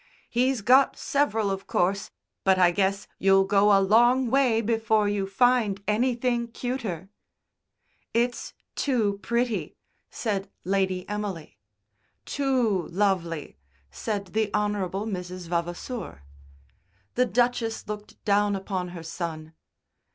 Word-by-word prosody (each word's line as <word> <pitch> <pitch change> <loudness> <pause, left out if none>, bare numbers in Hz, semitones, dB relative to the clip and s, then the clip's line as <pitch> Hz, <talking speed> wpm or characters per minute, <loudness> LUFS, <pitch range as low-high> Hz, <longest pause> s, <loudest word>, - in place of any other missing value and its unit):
"He's 250 0 +1
got 260 +6 +5
several, 225 -8 0
of 195 0 -5
course, 195 +3 0 0.3
but 190 -1 +4
I 180 -1 +5
guess 195 +2 0
you'll 195 0 +5
go 200 +1 +4
a 200 - +7
long 240 +5 +4
way 255 -4 +3
before 220 -1 +1
you 205 -1 -1
find 215 -1 +2
anything 240 +2 +1
cuter." 230 -7 -4 1.0
"It's 240 +1 -1 0.2
too 220 -8 0
pretty," 235 0 -1 0.3
said 200 -4 -3
Lady 190 -1 0
Emily. 200 - -5 0.7
"Too 245 - 0
lovely," 170 - -1 0.3
said 205 -3 -3
the 220 -1 +1
Hon. 210 0 +1 0.3
Mrs. 180 -3 -5
Vavasour. 175 - -4 0.9
The 250 - +3
Duchess 240 +1 0
looked 210 0 -8
down 205 0 +3
upon 190 -2 -3
her 165 - -8
son. 160 -1 -5
205 Hz, 115 wpm, -26 LUFS, 190-235 Hz, 1.0 s, a